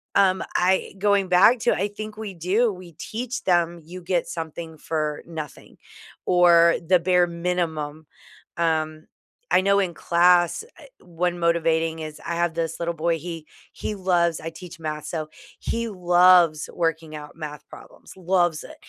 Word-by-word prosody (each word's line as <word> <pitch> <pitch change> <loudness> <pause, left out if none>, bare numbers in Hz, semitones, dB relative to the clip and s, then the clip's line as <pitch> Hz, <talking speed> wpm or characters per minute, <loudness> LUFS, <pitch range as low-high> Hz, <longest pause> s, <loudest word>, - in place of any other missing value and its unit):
um, 190 -1 +4
I 185 +1 +1
going 200 -1 +2
back 195 +7 +6
to 240 - +2
I 200 +3 -1
think 215 +1 -8
we 215 -3 -6
do. 190 +7 +1
We 180 -2 -12
teach 240 - -5
them 175 -1 +1
you 180 +4 -10
get 175 -1 -1
something 160 -1 -6
for 155 -1 -3
nothing 160 -3 -9 0.5
or 170 -2 +5
the 180 0 +5
bare 180 0 +3
minimum. 165 -3 -3 0.5
Um, 155 -1 -1 0.5
I - - +5
know 200 +1 +3
in 180 -4 -1
class, 175 - +3 0.2
er, - - -14 0.2
one 175 0 -2
motivating 165 -1 +1
is 155 -1 -8
I 170 - -2
have 170 -1 0
this 165 -1 -3
little 170 0 -2
boy. 165 +1 0
He 165 -2 -7 0.3
he 210 - -4
loves 175 -4 +1
I 165 +1 -5
teach 175 +1 -11
math, 150 -1 -5
so 155 -2 -4 0.3
he 230 0 -3
loves 180 -4 +4
working 165 -2 -2
out 150 -1 -10
math 150 -2 -8
problems. - - -14
Loves 175 -3 +1
it. - - -11
170 Hz, 160 wpm, -24 LUFS, 160-185 Hz, 0.5 s, back